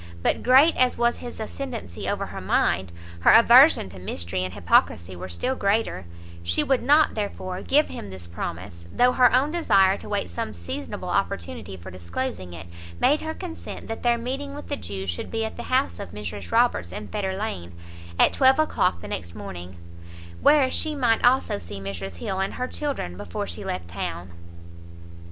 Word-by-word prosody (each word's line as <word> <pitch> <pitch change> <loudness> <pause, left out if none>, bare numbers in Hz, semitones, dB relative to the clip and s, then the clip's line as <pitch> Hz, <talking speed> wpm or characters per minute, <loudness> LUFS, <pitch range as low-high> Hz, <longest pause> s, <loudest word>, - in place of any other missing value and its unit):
But - - +1
great 265 +6 +6
as 255 -1 +3
was 240 0 +2
his 240 -2 -8
[ascendancy] 230 - -5
over - - -1
her - - -7
mind, 90 +1 +1 0.3
her 85 - +4
aversion 240 - +7
to 95 - -11
mystery 90 0 -3
and 90 0 -5
hypocrisy 85 -1 +2
were 90 +1 -7
still 250 - -1
greater; 200 - 0 0.4
she 85 0 +1
would 265 -2 +2
not, 295 +5 +4
therefore, 190 -3 -4
give 300 +3 +3
him 100 - -7
this 95 -2 -9
promise, 85 0 -6
though 250 +1 +4
her 250 -1 +5
own 265 +4 +3
desire 195 - +4
to - - -10
wait 205 - -2
some 85 - -4
seasonable 85 +1 -6
opportunity 85 +3 -2
for 90 +2 -10
disclosing 90 +1 -5
it, 85 -1 -8 0.3
made 300 - +3
her 315 0 -4
consent 350 -3 -8
that 225 - -4
their 240 -1 +3
meeting 270 +4 -4
with 290 - -9
the 285 - 0
Jew 95 - -6
should 85 -2 -4
be 225 -1 -1
at 220 - -6
the - - -6
house 90 - +1
of - - -6
Mrs 100 -3 -6
Roberts 85 -1 +2
in 105 +3 -6
Fetter 190 -2 -3
lane, 90 - -4 0.5
at - - +5
twelve 265 -1 +5
o'clock 305 - +1
the - - -7
next 85 +1 -5
morning; 90 -3 -8 0.6
where 285 -3 +5
she 310 -1 -1
might 240 -5 +2
also 245 -4 +3
see 100 -1 -8
Mrs 95 -2 -6
Hill 190 - -3
and 195 - -1
her 250 - -2
children 270 - -4
before 85 - -4
she 85 -2 -5
left 90 -2 -4
town. 85 0 -5
180 Hz, 185 wpm, -25 LUFS, -, 0.6 s, aversion